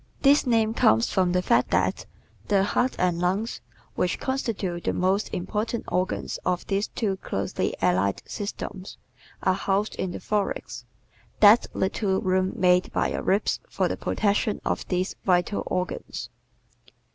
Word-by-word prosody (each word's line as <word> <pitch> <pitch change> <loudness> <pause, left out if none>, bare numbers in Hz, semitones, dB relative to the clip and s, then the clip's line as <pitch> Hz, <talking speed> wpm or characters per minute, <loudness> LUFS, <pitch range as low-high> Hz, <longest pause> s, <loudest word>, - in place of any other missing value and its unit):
¶ - - -32 0.2
This 280 0 +5
name 225 -2 +2
comes 110 - +3
from 185 -2 +2
the 180 0 +1
fact 125 -7 +3
that 95 +1 0 0.4
the 200 -2 +3
heart 245 +5 +1
and 180 -2 +1
lungs 190 +6 -1 0.3
(which 180 - -1
constitute 210 -10 -2
the - - +1
most 190 +3 0
important 215 +6 -2
organs 185 +1 -1
of 180 -1 -1
these 200 +2 0
two 200 -5 -2
closely 100 - -2
allied 95 +2 +1
systems) 200 -2 -6 0.5
are 185 - +3
housed 195 +3 0
in 190 - -2
the 175 - -6
thorax 210 -2 -3 0.5
that 215 +2 +7
little 190 0 0
room 185 0 +1
made 180 0 +3
by - - 0
your - - -2
ribs 200 +2 +1
for - - 0
the - - -2
protection 205 0 0
of - - -2
these 185 +1 -1
vital 180 +2 +2
organs. 180 0 -3
190 Hz, 150 wpm, -25 LUFS, 180-210 Hz, 0.5 s, that